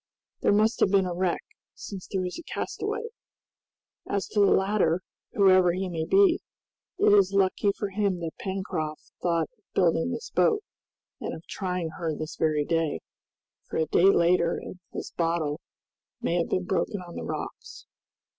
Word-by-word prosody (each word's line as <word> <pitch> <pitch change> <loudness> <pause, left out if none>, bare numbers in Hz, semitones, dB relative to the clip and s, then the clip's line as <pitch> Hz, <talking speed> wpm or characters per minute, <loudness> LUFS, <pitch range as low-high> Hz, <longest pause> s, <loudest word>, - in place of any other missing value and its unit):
There - - +3
must 215 +3 +3
have - - +4
been 195 -1 +4
a 180 - -2
wreck, 180 0 0 0.3
since 195 -3 -8
there 190 -2 -2
is 180 - -5
a - - -9
castaway. 455 - -3 1.1
As 200 -1 -1
to 210 - 0
the 200 - +6
latter, 190 -3 +2 0.3
whoever 185 -3 +5
he 185 +1 -2
may 160 -2 -2
be, 385 - +5 0.6
it 380 - +5
is 200 -1 +5
lucky 195 +1 +3
for 205 - -2
him 195 -2 0
that 165 -1 -3
Pencroft 185 -6 -4
thought 170 -2 +2
of 215 - -40
building 170 +3 +3
this 455 - -5
boat 430 -1 +3 0.6
and - - -4
of 160 - -12
trying 180 -4 -3
her 160 -3 -1
this 155 +1 -5
very 150 -2 +1
day, 165 - 0 0.7
for - - -3
a 160 - +2
day 170 - +3
later 170 -2 +3
and 185 - -8
this - - -6
bottle 165 -3 -1 0.6
might 175 - 0
have 170 - -1
been 185 - 0
broken 190 +3 -1
on 175 -1 -10
the - - -5
rocks." - - -6
185 Hz, 170 wpm, -27 LUFS, 165-200 Hz, 1.1 s, the